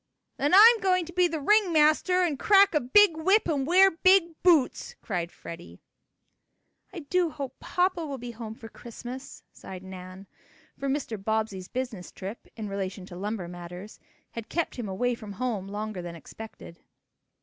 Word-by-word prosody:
"Then 290 +6 +2
I'm 450 +3 +8
going 365 -3 +1
to 345 - -11
be 360 0 +3
the 320 -2 -4
ring 415 +5 +3
master 315 +4 +3
and 310 -6 -1
crack 400 -1 +5
a 300 - +3
big 335 +8 +5
whip 385 +7 +3
and 285 -4 -1
wear 380 +3 +6
big 345 0 +4
boots!" 345 - +2
cried 175 -4 -4
Freddie. 170 +1 -11 1.1
"I 345 - -7
do 350 +3 0
hope 275 -4 -7
papa 360 -1 0
will 285 -3 -5
be 245 -1 -7
home 225 -1 -8
for 225 - -11
Christmas," 245 +3 -10
sighed 185 -1 -10
Nan, 185 0 -10 0.5
for 275 +1 -4
Mr. 245 -7 -3
Bobbsey's 215 -3 -2
business 245 -8 -5
trip, 200 +4 -8
in 220 -2 -6
relation 195 -1 -5
to 185 - -11
lumber 200 -1 -4
matters, 175 +3 -10 0.3
had 230 -1 -8
kept 335 0 -2
him 230 -5 -4
away 245 +6 0
from 215 -3 -8
home 210 -3 -3
longer 210 -1 -5
than 175 -1 -7
expected. 170 0 -11
245 Hz, 170 wpm, -27 LUFS, -, 1.1 s, I'm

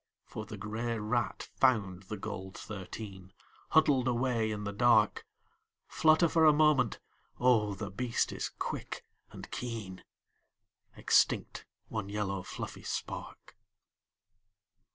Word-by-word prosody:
For 110 -1 -7
the 110 - -7
grey 110 +3 -3
rat 110 +2 -1
found 100 -9 +2
the 105 - -3
gold 95 -2 -6
thirteen 95 -2 -8 0.4
Huddled 145 -5 +4
away 120 -2 +1
in 105 -1 -3
the 100 0 -3
dark, 110 -1 +3 0.6
Flutter 160 +2 +4
for 165 0 +3
a 155 - +8
moment, 150 -6 +3 0.4
oh 110 -5 +3
the 100 0 -5
beast 120 +4 0
is - - -3
quick - - -5 0.2
and - - -10
keen, 110 -7 -5 0.9
Extinct - - +2 0.2
one 110 -3 -4
yellow 100 -2 -2
fluffy - - -7
spark. - - -6
110 Hz, 115 wpm, -31 LUFS, 100-125 Hz, 0.9 s, a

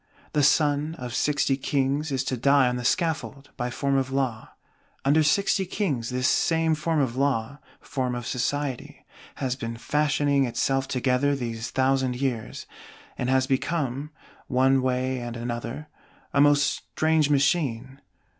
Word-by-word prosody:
The 150 - +2
Son 145 +2 +2
of 125 -5 -6
Sixty 140 -1 +1
Kings 140 +2 -1
is 135 -1 0
to 130 - -2
die 140 +2 +4
on 125 - 0
the 125 - -4
Scaffold 155 -1 -1
by 120 0 -2
form 140 +2 0
of 130 -1 0
Law. 130 -5 -2 0.6
Under 145 +3 +4
Sixty 190 +5 +2
Kings 165 - -2
this 125 +1 0
same 160 +3 +2
form 155 +1 0
of 130 -4 0
Law, 140 0 -1 0.2
form 130 -3 -3
of 120 -1 -5
Society, 135 +1 -3 0.3
has 130 -2 -2
been 115 -3 -5
fashioning 145 0 +1
itself 135 +2 0
together 130 +1 +1
these 115 -3 -4
thousand 130 -1 +1
years; 125 -5 -3 0.5
and 125 - -2
has 130 0 +3
become, 140 0 -1 0.4
one 130 +1 +3
way 130 0 -1
and 120 -1 -6
other, 120 +6 -5 0.5
a 140 - +4
most 145 0 +5
strange 155 -2 0
Machine. 135 -3 0
135 Hz, 145 wpm, -25 LUFS, 125-145 Hz, 0.6 s, most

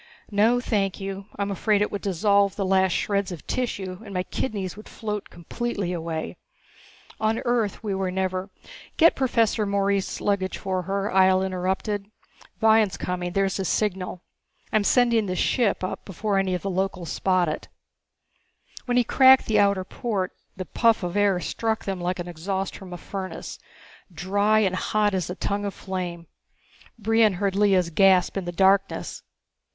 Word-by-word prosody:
"No, 220 +4 +3
thank 205 -6 -1
you. 195 0 -6
I'm 200 0 -1
afraid 205 +1 +2
it - - -3
would 205 - -4
dissolve 200 +1 +2
the 200 -2 -1
last 190 0 +3
shreds 200 -2 0
of 175 - -8
tissue 190 -7 -3
and 200 -3 -9
my 180 - 0
kidneys 195 -4 -3
would 215 - -12
float 210 -2 -5
completely 195 +1 -4
away. 165 -2 -4 0.8
On 220 +1 +1
Earth 235 -4 0
we 205 -2 -2 0.2
never 185 +1 -2 0.2
" - - -18
"Get 330 0 +6
Professor 230 -4 +1
Morees' 200 -1 0
luggage 195 -2 -1
for 185 -1 -2
her," 200 +1 -1
Ihjel 190 0 +4
interrupted. 190 +2 -2 0.5
"Vion's 220 -3 +4
coming, 180 -1 -3
there's 195 0 +1
his 190 -2 -2
signal. 185 -3 -1 0.5
I'm 215 - +3
sending 235 -1 +3
this 185 0 -2
ship 220 -4 +1
up 185 - -4
before 195 +1 -1
any 190 -1 0
of 180 - -5
the 195 - -2
locals 185 -3 -2
spot 185 -2 +1
it." 155 - -4 1.2
When 245 -1 +1
he 245 - +5
cracked 260 +2 +6
the 215 -1 +2
outer 200 -2 +3
port 195 -1 -3 0.3
the 185 - -4
puff 230 0 +2
of 175 +1 -3
air 200 -3 +3
struck 220 +4 -2
them 190 -2 -3
like 180 +1 -1
the 175 -1 -5
exhaust 190 +3 -3
from 190 -2 -10
a 175 - -5
furnace, 190 +2 -6 0.5
dry 200 +5 +2
and 190 -3 +1
hot 210 +2 +1
as 185 -2 -1
a 180 - -4
tongue 200 +1 -2
of 200 -2 -4
flame. 180 -3 -5 0.7
Brion 225 -1 +3
heard 195 +1 -1
Lea's 195 -4 +3
gasp 185 +1 +4
in 195 -2 -3
the 175 - -3
darkness. 195 +2 +1
195 Hz, 165 wpm, -25 LUFS, 185-210 Hz, 1.2 s, Get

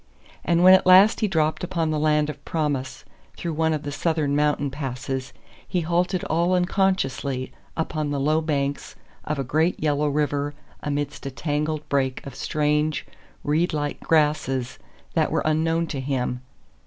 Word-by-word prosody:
And 170 0 +2
when 185 +1 +9
at 190 - +5
last 190 +4 +7
he 215 - +2
dropped 160 -4 0
upon 170 -3 -1
the 155 - 0
land 150 -1 +2
of 150 -2 -7
promise 145 -5 -2 0.3
through 170 -2 -3
one 160 +1 +1
of 155 -1 -2
the 145 - -4
Southern 150 -1 0
mountain 145 -1 +1
passes 135 -1 -4 0.4
he 180 -2 0
halted 175 +2 0
all 170 +3 +1
unconsciously 175 -8 0 0.3
upon 155 -2 -2
the 145 -1 -1
low 155 +3 +2
banks 145 -3 -2 0.3
of 150 - -2
a 135 - -1
great 160 +7 +1
yellow 150 -1 +1
river 145 0 -1 0.3
amidst 145 -1 -3
a - - -2
tangled 150 +2 -2
brake 135 -2 -1
of 140 - -7
strange, 150 +2 0 0.4
reed 160 +4 +1
like 145 -1 -2
grasses 150 -5 +1 0.3
that - - +2
were - - +1
unknown 165 +2 +1
to 145 -4 -5
him. 125 -2 -2
150 Hz, 160 wpm, -24 LUFS, 140-165 Hz, 0.4 s, when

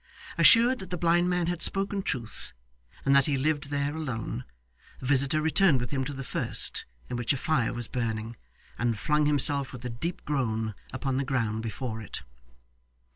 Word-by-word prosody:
Assured 245 +2 +6
that 190 - -8
the 180 - -2
blind 175 +1 +3
man 180 -1 +1
had 175 0 -2
spoken 195 +2 +1
truth, 120 - -4 0.5
and 135 0 +5
that 140 -1 +5
he 145 -2 +1
lived 145 +1 0
there 145 +1 -1
alone, 120 - -4 0.5
the - - -8
visitor 140 +3 +3
returned 160 -2 +4
with 120 -1 -4
him 135 -2 0
to 145 - -4
the 135 0 -5
first, - - 0 0.2
in 125 - -3
which 120 +3 +1
a - - -2
fire 130 -4 +1
was 120 -2 -5
burning, 115 -2 -3 0.4
and 115 -1 +1
flung 150 +5 +2
himself 145 -1 +1
with 125 -1 -9
a 125 - -3
deep 165 +10 -4
groan 115 -6 -1 0.2
upon 130 0 -2
the 140 - +1
ground 115 -5 -1
before 115 0 -4
it. 105 - -7
135 Hz, 185 wpm, -28 LUFS, 120-155 Hz, 0.5 s, Assured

